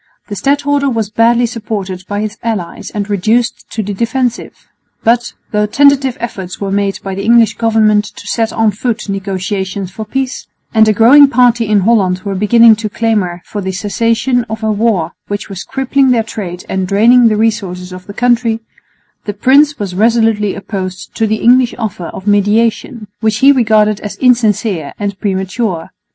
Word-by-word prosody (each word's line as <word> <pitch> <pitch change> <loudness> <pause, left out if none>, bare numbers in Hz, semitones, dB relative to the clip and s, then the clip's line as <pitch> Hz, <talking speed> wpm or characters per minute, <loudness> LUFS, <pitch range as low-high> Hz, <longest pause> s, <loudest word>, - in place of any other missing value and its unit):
The 205 - -4
stadholder 285 +5 0
was 225 -4 -2
badly 235 +2 +3
supported 205 -5 -5
by 205 0 -3
his 215 0 -4
allies 215 -7 -4
and 205 -1 -4
reduced 220 +4 -1
to 220 - -3
the 205 +1 -4
defensive; 240 +3 -3 0.4
but, 235 +1 +1 0.2
though 210 0 +1
tentative 275 +1 +3
efforts 190 -6 -6
were 195 -1 -3
made 200 0 0
by 195 - -4
the 195 - -4
English 230 +1 +4
government 215 -2 +2
to - - -12
set 225 -1 -1
on 225 -1 +1
foot 225 +2 -3
negotiations 195 -1 -3
for 220 +4 -6
peace, 265 +3 -4 0.3
and 220 -1 +5
a - - +5
growing 260 +7 +7
party 240 -2 +2
in 210 -1 +2
Holland 190 -4 +2
were 200 -2 -3
beginning 220 +3 +5
to 215 -1 -4
clamour 200 -6 -1
for 205 - -5
the 190 0 -3
cessation 230 +6 0
of 220 0 -5
a 220 - +1
war 210 -5 0 0.2
which 205 +1 -5
was 195 -1 -6
crippling 270 0 0
their 235 -3 +2
trade 185 -5 -7
and 190 -1 -2
draining 230 +5 +5
the 215 -1 +1
resources 190 -5 -2
of 185 0 -11
the 200 - -8
country, 240 -2 +1 0.7
the 205 - -4
prince 285 +7 +3
was 200 -3 -4
resolutely 220 0 +1
opposed 185 -2 -6
to 225 - 0
the 215 0 -2
English 250 0 +4
offer 210 -7 -4
of 190 - -9
mediation, 215 +3 +1
which 220 -1 0
he 275 +5 +6
regarded 215 -5 +2
as 205 -2 -7
insincere 215 - +1
and 200 -1 -4
premature. 190 -2 -3
215 Hz, 175 wpm, -13 LUFS, 200-235 Hz, 0.7 s, growing